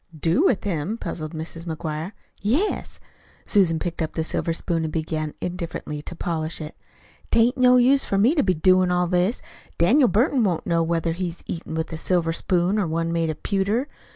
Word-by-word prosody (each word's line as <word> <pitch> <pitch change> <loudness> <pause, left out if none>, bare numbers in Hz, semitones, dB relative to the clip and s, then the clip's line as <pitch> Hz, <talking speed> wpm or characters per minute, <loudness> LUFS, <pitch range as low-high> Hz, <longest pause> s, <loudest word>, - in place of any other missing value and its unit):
"Do 170 - +2
with 210 - +2
him?" 190 +2 -2
puzzled 155 -8 -5
Mrs. 165 +2 -6
McGuire. 160 +3 -4 0.3
"Yes." 275 - -1 0.5
Susan 185 -6 +3
picked 170 +1 -4
up 160 - -2
the 160 - -1
silver 165 +1 -2
spoon 165 0 -1
and 160 - -3
began 155 -1 -3
indifferently 170 -4 -4
to 175 - -8
polish 165 -1 -3
it. 155 -1 -7 0.5
"'Tain't 235 +2 +3
no 250 -1 +5
use 265 +3 +4
for 195 - -1
me 225 +9 +4
to 310 - +2
be 185 -2 +1
doin' 185 +3 +4
all 180 0 +2
this. 180 +6 0 0.3
Daniel 250 - +5
Burton 240 - +2
won't 180 -6 0
know 170 -1 +2
whether 165 0 0
he's 175 0 -4
eatin' 165 -1 -5
with 160 +1 -3
a - - -3
silver 165 0 0
spoon 180 +4 +1
or 195 - 0
one 165 +1 -1
made 165 -1 0
of 155 - -5
pewter. 205 +7 0
175 Hz, 190 wpm, -23 LUFS, 160-200 Hz, 0.5 s, no